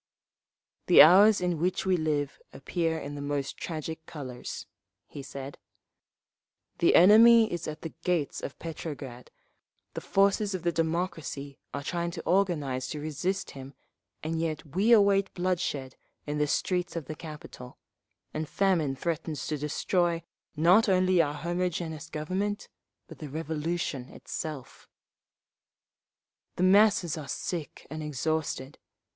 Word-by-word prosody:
"The - - +10
hours 200 +6 +7
in 175 -3 0
which 180 +4 0
we 190 -1 +3
live 150 -4 -1
appear 165 +3 -2
in 145 -2 -6
the 145 - -6
most 145 -1 -2
tragic 160 -1 -5
colours," 130 -6 -7 0.4
he 145 - -8
said. 135 0 -8 1.2
"The 170 - +4
enemy 225 +4 +7
is 175 -1 -4
at 155 0 -6
the 165 - -6
gates 175 -5 0
of 140 - -6
Petrograd, 145 -6 -7 0.6
the - - -5
forces 200 +1 +2
of 180 - -5
the 170 - +2
democracy 160 -4 -3
are 140 - -5
trying 170 +2 -2
to - - -5
organise 150 -9 0
to 150 - -5
resist 155 +6 -3
him, 135 0 -10 0.5
and 160 +1 -2
yet 160 -2 -3
we 210 +5 +3
await 200 -3 +5
bloodshed 175 -8 -2 0.3
in 150 0 -3
the 150 - +2
streets 180 +4 -1
of 165 -4 -4
the 155 - -5
capital, 150 -5 -10 0.6
and 155 0 -3
famine 170 -8 +1
threatens 160 +1 -3
to 155 - -2
destroy, 170 +3 0 0.3
not 180 +8 +5
only 185 -1 +4
our 145 -2 -1
homogeneous 165 -1 -3
Government, 190 +7 -3 0.4
but - - -12
the 150 - -7
Revolution 155 -2 -3
itself…. 155 -6 -7 1.7
"The 180 - -1
masses 195 -4 +4
are 145 - -8
sick 165 +1 -5
and 155 0 -5
exhausted. 150 -2 -3
160 Hz, 135 wpm, -28 LUFS, 150-180 Hz, 1.7 s, The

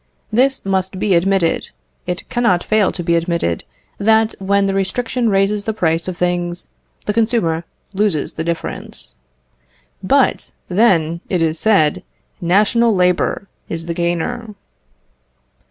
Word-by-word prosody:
This 265 +2 +2
must 190 -1 -1
be 200 0 +1
admitted; 180 -1 +1 0.4
it 180 0 -4
cannot 190 -8 +1
fail 215 -3 +2
to 175 - -5
be 170 0 +2
admitted, 170 - -1 0.3
that 220 +1 +3
when 200 +1 +2
the 195 - 0
restriction 230 +5 0
raises 200 +1 +1
the 220 - -2
price 165 -3 0
of 185 -2 -4
things, 175 0 -2 0.4
the 210 - 0
consumer 210 -8 +1 0.3
loses 195 -6 +1
the 160 - -4
difference. 170 0 -5 0.9
But, - - +1 0.2
then, 170 -5 +2
it 180 -3 +1
is 160 0 0
said, 195 -9 +3 0.4
national 210 +6 +3
labour 180 +2 +1 0.2
is 165 0 -4
the 170 - -3
gainer. 175 +7 -2
190 Hz, 130 wpm, -18 LUFS, 170-215 Hz, 0.9 s, that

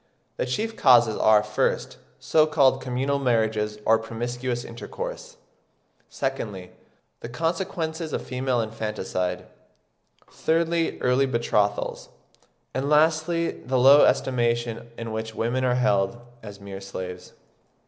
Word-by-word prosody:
The - - -1
chief 220 - -2
causes 120 - +5
are, 110 -1 +4
first, 105 0 -1 0.2
so 155 -1 +3
called 135 -4 +3
communal 135 +2 -1
marriages 110 -4 0
or 110 0 +4
promiscuous 120 +2 -4
intercourse; - - -7 0.7
secondly, 105 -9 -4 0.5
the 115 - -8
consequences 165 +2 -3
of - - -3
female 125 -1 -1
infanticide; 105 -5 -3 0.8
thirdly, 165 +1 0
early 125 +2 +2
betrothals; 105 -4 -1 0.6
and 135 +2 -2
lastly, 160 +2 +2
the 130 +1 -3
low 135 +3 +7
estimation 120 -2 0
in 115 -1 -5
which 110 0 -5
women 120 +3 -1
are 125 -1 +2
held, 120 -3 +1 0.2
as 105 -2 -10
mere 100 -1 -8
slaves. 90 -2 -7
125 Hz, 115 wpm, -25 LUFS, 110-140 Hz, 0.8 s, low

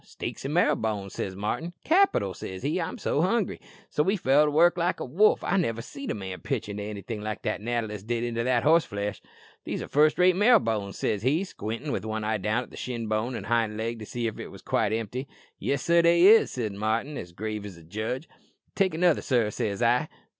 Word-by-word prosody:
"'Steaks - - -7
an' 135 - -3
marrow 155 -2 +3
bones,' 105 -4 -3
says 95 -1 -4
Martin." 120 - -3
"'Capital!' 320 - +3
says 95 +3 -7
he. 155 +6 0
'I'm 165 - -4
so 145 - 0
hungry.'" 195 +3 0 0.3
"So 150 - +2
he 195 +3 +2
fell 145 -2 +4
to - - +1
work 165 +4 +4
like 175 +1 0
a - - -3
wolf. 190 +12 +3
I - - +1
niver 115 - -1
seed 280 - -8
a - - -1
man 95 -3 -6
pitch 130 -7 -3
into 105 0 -5
anything 105 +1 -5
like 110 0 -3
as - - -46
that - - -2
natter 120 +1 -1
list 105 -1 -8
did 120 0 -1
into 115 -1 -1
that 125 -1 +2
horseflesh." 105 -11 +1 0.4
"'These - - -4
are - - -7
first 150 +1 +3
rate 180 0 +5
marrow 225 +5 +6
bones,' 105 - -2
says 105 - -1
he, 145 - +2
squintin' 120 - -5
with - - -2
one 110 0 -3
eye 110 0 0
down 110 +6 -1
the - - -11
shin 120 -3 -4
bone 110 +4 -1
o' - - -4
the - - -9
hind 115 -2 +1
leg 115 +1 -3
to 110 - -7
see 120 -1 -3
if 110 -2 -3
it - - -6
was - - -13
quite 110 -2 +1
empty." 115 +4 -3 0.3
"'Yes, 140 -2 -1
sir, 170 0 +4
they 170 +1 +5
is,' 215 -6 +6
answered 105 -5 -3
Martin, 115 +7 -1
as 90 -9 -7
grave 105 +3 -4
as 100 -4 -9
a 85 - -14
judge." 110 - -4 0.5
"'Take 190 -4 +1
another, 175 -1 +3
sir,' 120 -5 +1
says 105 +2 -2
I." 125 +6 +2
115 Hz, 235 wpm, -27 LUFS, 105-155 Hz, 0.5 s, marrow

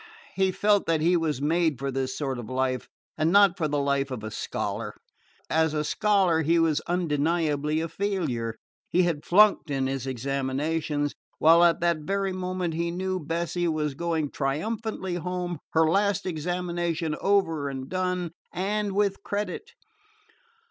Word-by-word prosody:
He 190 -1 +2
felt 205 +1 +2
that 165 -1 +2
he 170 +3 +3
was 155 -5 0
made 160 -1 +2
for 135 +1 -3
this 130 0 -2
sort 135 -4 -2
of 110 - -7
life 130 0 -1 0.3
and 155 +2 +2
not 200 -2 +6
for 165 -5 -1
the 145 0 -1
life 140 -1 +1
of 125 -5 -5
a 110 - -5
scholar. - - -4 0.5
As 160 -1 +1
a 150 - 0
scholar 190 -1 +2
he 165 +2 +3
was 160 -2 +2
undeniably 155 -2 0
a 165 - -2
failure. 160 - -2 0.3
He 180 - +3
had 165 -4 -1
flunked 205 -2 +5
in 135 -2 0
his 135 -1 -3
examinations, 140 +4 -1 0.2
while 165 +2 +6
at 170 -1 +4
that 170 -2 +2
very 195 +5 -1
moment, 185 -2 -2
he 170 +1 -1
knew, 185 +2 -2
Bessie 170 +2 -2
was 155 -3 -1
going 160 -1 -1
triumphantly 190 +6 -2
home, 180 -1 -3
her 160 0 +4
last 200 +3 +1
examination 175 -1 -2
over 165 -8 +2
and 135 -1 -5
done, 180 0 -1 0.2
and 205 +2 -1
with 200 -1 +1
credit. 205 +1 -4
165 Hz, 155 wpm, -26 LUFS, 145-180 Hz, 0.5 s, not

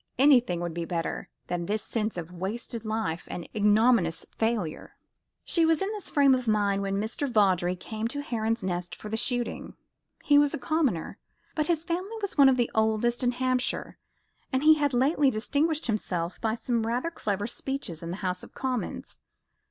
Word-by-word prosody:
Anything 250 -10 +4
would 175 -1 -3
be 170 0 -3
better 165 -1 -3 0.2
than 175 -1 -3
this 210 0 -1
sense 215 -3 -2
of 170 0 -5
a - - -13
wasted 220 +6 -4
life 215 -6 -2
and 175 - -5
ignominious 210 -4 +3
failure. 220 -8 -2 0.5
She 335 - +1
was 325 -1 +3
in 390 +2 -1
this 420 -3 -5
frame 280 -2 +5
of 255 -2 -1
mind 205 -2 +2
when 195 0 -1
Mr. 225 +7 -2
Vawdrey 185 -5 +3
came 220 +4 -4
to 285 +4 -4
Heron's 225 -4 -1
Nest 175 -1 -3
for 210 - -9
the 220 - -2
shooting. 245 +1 -2 0.5
He 290 -1 +6
was 290 +1 +3
a - - -3
commoner, 275 - -1 0.3
but 305 -2 0
his 335 -2 0
family 370 +6 -3
was 400 -2 -4
one 280 -3 +7
of 260 - +3
the 240 -1 +1
oldest 220 +3 +1
in 245 0 +2
Hampshire, 255 0 -1 0.5
and 260 +1 0
he 315 +1 +8
had 290 -4 +1
lately 275 +3 +3
distinguished 290 +7 0
himself 180 -6 -2
by 220 -1 0
some 230 -1 -1
rather 250 +8 -1
clever 205 - -2
speeches 240 - -5
in 165 - -6
the 180 - -4
House 180 0 -1
of - - -12
Commons. 255 -3 -4
230 Hz, 185 wpm, -27 LUFS, 195-275 Hz, 0.5 s, he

